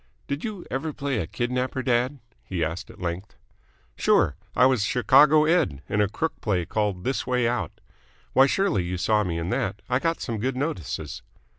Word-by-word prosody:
"Did 140 +2 -3
you 210 -5 -5
ever 150 +4 -2
play 140 -5 -2
a 85 - -2
kidnapper, 125 +4 -2
dad?" 125 +2 +1 0.3
he 90 -3 -2
asked 85 +4 -4
at - - -14
length. 90 +2 -4 0.6
"Sure. 70 - +3 0.2
I 125 - +6
was 130 -5 +3
Chicago 140 +8 +5
Ed. 155 - +1
in 105 - +1
a 105 - +2
crook 160 +9 -3
play 95 -5 0
called 105 -3 -1
'This 130 +5 -2
Way 125 -2 +2
Out.' 115 -8 -2 0.5
Why, 135 +1 +6
surely 140 - +1
you 90 +1 -3
saw 105 +4 +2
me 85 -4 -2
in 85 +2 -3
that? 95 +2 -2
I 125 0 +2
got 165 +2 0
some 115 -4 -3
good 130 +3 -1
notices." 130 - -3
120 Hz, 185 wpm, -25 LUFS, 95-135 Hz, 0.6 s, I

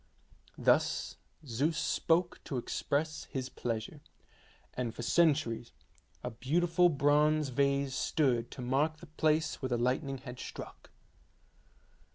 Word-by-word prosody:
Thus - - +2 0.3
Zeus 140 +6 0
spoke 170 +1 +1
to 135 - -3
express 150 +5 -2
his 130 -1 -4
pleasure, 115 +5 -4 0.7
and 120 -2 -3
for 120 - -5
centuries 140 -7 +2 0.5
a 125 - -3
beautiful 170 +9 +2
bronze 150 0 +3
vase 140 +1 +1
stood 130 -5 +1
to 125 - -8
mark 145 +5 +1
the 170 - -12
place 155 0 0
where 130 - -2
the 120 - +1
lightning 130 +3 0
had 125 -1 -9
struck. - - -9
140 Hz, 120 wpm, -32 LUFS, 125-155 Hz, 0.7 s, bronze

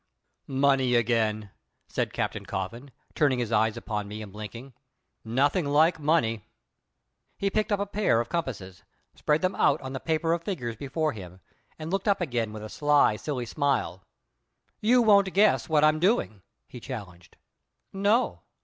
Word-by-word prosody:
"Money 135 -2 +2
again!" 110 -3 0 0.4
said - - -2
Captain - - -3
Coffin, 115 +9 -5 0.2
turning 140 -4 +2
his 120 -2 -2
eyes 110 -1 +2
upon 105 -2 -4
me 105 +1 -7
and 100 -2 -11
blinking. 115 +5 -9 0.5
"Nothing 140 +10 +1
like 160 +4 +3
money!" 145 -9 +1 0.9
He 200 0 -1
picked 215 +1 0
up 205 - +2
a 200 - 0
pair 205 - +1
of 120 - -2
compasses, 105 - -4 0.3
spread 150 +3 0
them 185 +1 +1
out - - +2
on 130 0 -6
the 130 - -4
paper 165 +2 0
of 170 - -1
figures 125 - -4
before 150 +5 -2
him, 90 -4 -10 0.4
and 155 +1 -6
looked 195 +2 -1
up 200 -1 +3
again 120 - -2
with 110 0 -8
a - - -5
sly, 145 -3 +3
silly 125 +2 -4
smile. 140 - -1 0.8
"You 245 +3 +4
won't 200 -3 +5
guess 205 -2 +3
what 150 -1 +3
I'm 155 0 +4
doing?" 175 - +1 0.3
he 125 - -10
challenged. 95 -10 -9 0.6
"No." 205 +5 +1
135 Hz, 160 wpm, -27 LUFS, 110-165 Hz, 0.9 s, won't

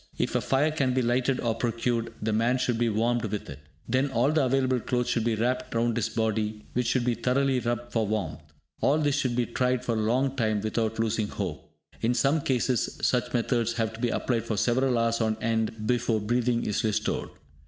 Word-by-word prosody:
If - - -1
a - - +1
fire 145 +4 +2
can 135 -5 0
be 130 - +2
lighted 125 +2 +1
or 115 -2 +1
procured, 115 0 -1
the 110 0 -1
man 115 +4 +2
should 125 -2 0
be 120 -1 +2
warmed 115 +2 +1
with 105 -1 -4
it. 70 - -9 0.3
Then 130 +4 +1
all 130 +3 +2
the 155 -2 +2
available 130 -1 +2
clothes 125 +1 -1
should 115 - +1
be 115 -1 +1
wrapped 125 +3 -1
round 115 0 +1
his 115 - 0
body, 110 -1 -1
which 125 -1 0
should 120 0 +1
be 125 - +2
thoroughly 130 +3 +1
rubbed 120 0 -3
for 110 -2 0
warmth. 95 -9 -2 0.4
All 145 - +3
this 145 -2 +1
should 130 -4 0
be 125 -1 +1
tried 125 +1 0
for 120 - 0
a 110 - 0
long 130 +5 +1
time 110 -4 +1
without 110 +1 -1
losing 110 -1 0
hope. 95 -8 -5 0.3
In 120 +2 +1
some 140 +6 +2
cases, 125 -2 0
such 125 -1 +1
methods 115 -1 +1
have 115 -2 -1
to 115 - -10
be 120 0 +1
applied 115 -1 -1
for 110 -2 -2
several 125 +3 +2
hours 115 0 +1
on 110 -1 +1
end 110 -1 -1
before 120 -1 +1
breathing 120 +2 0
is 105 - -1
restored. 110 -2 -1
120 Hz, 215 wpm, -27 LUFS, 110-125 Hz, 0.4 s, All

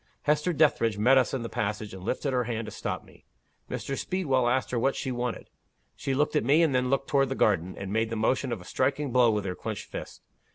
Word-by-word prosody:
Hester 150 +4 +2
Dethridge 140 - +2
met 130 +6 +5
us 130 - +1
in 130 -3 -2
the - - -3
passage, 105 -1 -3
and 95 - -8
lifted 130 +6 -1
her 125 -1 +1
hand 115 -1 -3
to - - -7
stop - - -4
me. - - -19 0.5
Mr. 135 - -3
Speedwell 135 -9 0
asked 130 +1 0
her 120 - 0
what 135 +3 +1
she 130 - -3
wanted. 120 -1 -3 0.5
She 135 -1 -2
looked 150 +3 +1
at - - +3
me, 145 +7 +4
and 155 -4 +2
then 125 0 +1
looked 135 0 0
toward 135 -2 +2
the 135 - -2
garden, 95 -6 +1
and 100 0 -5
made 110 0 +1
the 115 - -3
motion 125 +4 0
of 95 -7 -4
striking 140 +8 0
a - - -7
blow 125 -1 +5
with 105 -2 0
her 95 - -2
clenched - - -5
fist. - - -7
125 Hz, 245 wpm, -28 LUFS, 110-135 Hz, 0.5 s, met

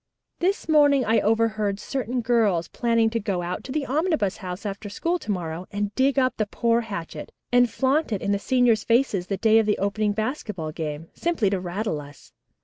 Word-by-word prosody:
"This 375 +1 0
morning 290 -4 +4
I 225 +2 +3
overheard 215 -2 +1
certain 250 -1 -3
girls 220 -8 +2
planning 230 -2 +1
to 230 - 0
go 195 -4 -2
out 180 +1 -4
to 260 - -6
the 295 0 -1
Omnibus 295 - 0
House 185 -1 -7
after 205 +1 -5
school 340 - -1
to - - -11
morrow 175 -1 -4
and 205 0 -2
dig 270 +1 +2
up 255 -1 +2
the 215 - 0
poor 235 +2 +1
hatchet 170 -9 -7 0.2
and 245 0 +5
flaunt 270 +5 +1
it 205 - 0
in 200 - -1
the 200 - +1
seniors' 245 -1 +2
faces 230 -7 +1
the 195 - -2
day 220 +2 +4
of 220 - +1
the 210 - +2
opening 205 +1 0
basketball 210 - -3
game, 155 +1 -5
simply 315 - 0
to 195 - 0
rattle 180 -2 -3
us. 145 0 -15
215 Hz, 200 wpm, -24 LUFS, 195-250 Hz, 0.2 s, and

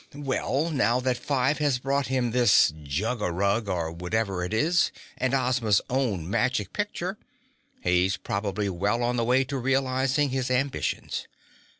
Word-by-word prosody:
Well, 145 +2 -1
now 125 -4 +2
that 125 0 +1
Five 135 +3 0
has 145 -4 +2
brought 135 +2 -1
him 125 -2 0
this 120 -9 +5
jug 100 - -2
a 90 - 0
rug 100 +4 0
or 85 -3 -1
whatever 90 +2 -2
it 90 - -4
is 160 +10 +2 0.2
and 130 +1 0
Ozma's 125 -5 +2
own 115 -11 0
magic 105 +1 0
picture - - -3 0.6
he's 90 +1 +2
probably 100 +2 -2
well 100 +6 0
on 120 +1 0
the 120 - +1
way 125 +3 +3
to 135 +1 -4
realizing 135 +2 +1
his 130 0 -2
ambitions. 130 +2 -1
125 Hz, 155 wpm, -26 LUFS, 100-130 Hz, 0.6 s, this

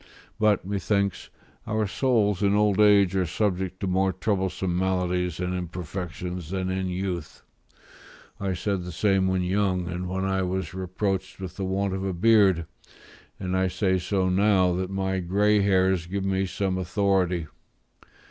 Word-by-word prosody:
But; 105 -4 +2
methinks, 100 0 -1 0.4
our 110 0 0
souls 105 -3 +1
in 100 0 +3
old 105 -1 +2
age 100 -3 +5
are 95 -2 +1
subject 95 0 -1
to - - -1
more 95 +1 +2
troublesome 95 -2 -1
maladies 90 -2 0
and 90 0 -2
imperfections 90 0 -5
than 95 0 -2
in 95 0 -1
youth; 90 -3 -4 1.0
I 95 -2 -1
said 100 +1 -1
the 90 - -6
same 95 +2 +2
when 95 -1 +1
young 95 -1 0
and 90 +1 -4
when 95 +1 -2
I 95 0 0
was 95 +1 -2
reproached 95 +1 -3
with 95 -2 -7
the 95 - -3
want 95 +1 -1
of 95 0 -3
a 95 -1 -1
beard; 95 -3 +4 0.7
and 95 -1 -2
I 95 0 +2
say 95 0 0
so 95 +1 0
now 95 -1 +3
that 90 +1 -2
my 95 -1 -1
grey 100 +4 +2
hairs 95 -3 +2
give 95 +2 -3
me 95 0 0
some 95 0 -2
authority. 95 -2 +1
95 Hz, 155 wpm, -26 LUFS, 90-100 Hz, 1.0 s, age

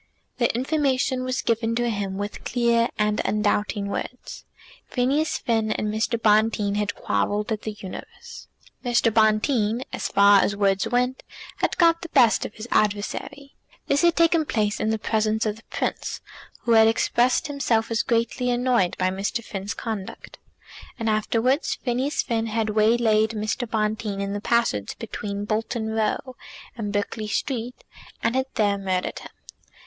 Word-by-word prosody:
The 235 - +3
information 260 -1 0
was 255 0 -2
given 230 0 0
to 240 0 0
him 200 -2 -3
with 205 +1 -5
clear 235 -1 +2
and 210 0 +1
undoubting 210 0 0
words. 225 +5 -6 0.4
Phineas 295 +6 0
Finn 225 -2 0
and 210 - -2
Mr. 220 +2 0
Bonteen 215 -1 +3
had 205 0 -1
quarrelled 205 - -1
at 215 -1 -1
The 215 - -4
Universe. 190 - -9 0.4
Mr. 240 -2 +2
Bonteen, 220 +2 +2
as - - -2
far 200 0 +6
as 200 - 0
words 195 -1 +1
went, 250 +1 0 0.4
had - - -1
got 335 -1 +4
the 340 - -7
best 235 -6 +4
of - - -18
his 220 +2 -8
adversary. 215 +7 -1 0.3
This 280 - +2
had 340 -1 +4
taken 335 -1 +4
place 215 -7 -1
in 215 - 0
the 220 - +1
presence 220 +1 0
of 215 0 -1
the 225 - -17
Prince, - - -3 0.4
who 235 - -1
had 220 -1 +7
expressed 240 +2 +2
himself 240 -6 0
as 230 - +2
greatly 240 +1 0
annoyed 245 -6 +1
by 185 0 +1
Mr. 200 +5 -2
Finn's 200 -1 -5
conduct. 215 -5 -6 0.6
And 225 -2 0
afterwards 230 +6 +1
Phineas 260 +4 -1
Finn 225 -1 -1
had 220 -1 -1
waylaid 220 0 +3
Mr. 215 +3 -2
Bonteen 215 -2 -1
in 200 0 -2
the 205 - -3
passage 230 - 0
between 205 -2 -5
Bolton 220 +1 -2
Row 220 +4 -1 0.4
and 210 -3 -4
Berkeley 210 +1 -2
Street, 245 +2 -3 0.4
and 230 +2 +1
had 260 0 +1
there 205 -2 +2
murdered 185 -2 -2
him. - - -11
225 Hz, 155 wpm, -24 LUFS, 210-245 Hz, 0.6 s, had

